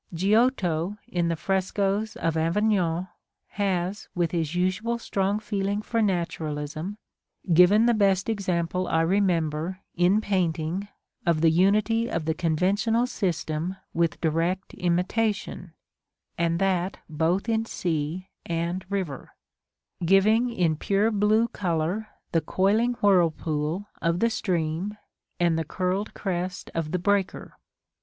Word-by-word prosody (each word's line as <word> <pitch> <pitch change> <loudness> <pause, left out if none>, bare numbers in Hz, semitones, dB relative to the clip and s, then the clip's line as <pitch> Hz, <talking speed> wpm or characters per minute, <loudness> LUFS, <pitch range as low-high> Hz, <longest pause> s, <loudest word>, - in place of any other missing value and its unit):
Giotto, 195 -2 +2
in 175 -1 0
the 165 - 0
frescoes 195 +4 -1
of 165 -1 -1
Avignon, 175 0 +1 0.4
has, 195 0 -2
with 170 -2 0
his 165 -2 -1
usual 185 +6 0
strong 200 -3 -1
feeling 205 -1 -2
for 230 +1 0
naturalism, 165 -2 -2 0.6
given 185 +7 +6
the 240 - +4
best 195 -3 +2
example 185 -4 -1
I 165 - +2
remember, 170 -2 +1 0.2
in 180 +4 +3
painting, 180 -2 -1 0.4
of 170 -4 +1
the 165 -1 +5
unity 215 +6 +2
of 165 -2 -2
the 160 - +1
conventional 195 +9 +1
system 175 -5 -2 0.2
with 170 0 0
direct 165 +4 0
imitation, 180 +1 -1 0.6
and 170 0 +1
that 185 0 0
both 165 +6 0
in 225 -1 +1
sea 170 -1 -3
and 170 +2 -2
river; 185 -9 -3 0.7
giving 210 +7 +4
in 175 -9 +1
pure 200 +6 +1
blue 215 +2 +3
color 180 +2 -2 0.2
the 165 - +2
coiling 215 +8 +2
whirlpool 165 -2 +2 0.2
of 170 +1 +1
the 230 +2 +2
stream, 175 +1 -2 0.4
and 170 -2 +2
the - - 0
curled 185 +6 -2
crest 180 -1 -3
of 160 -2 -2
the 180 - +1
breaker. 195 +1 -1
185 Hz, 120 wpm, -26 LUFS, 165-205 Hz, 0.7 s, given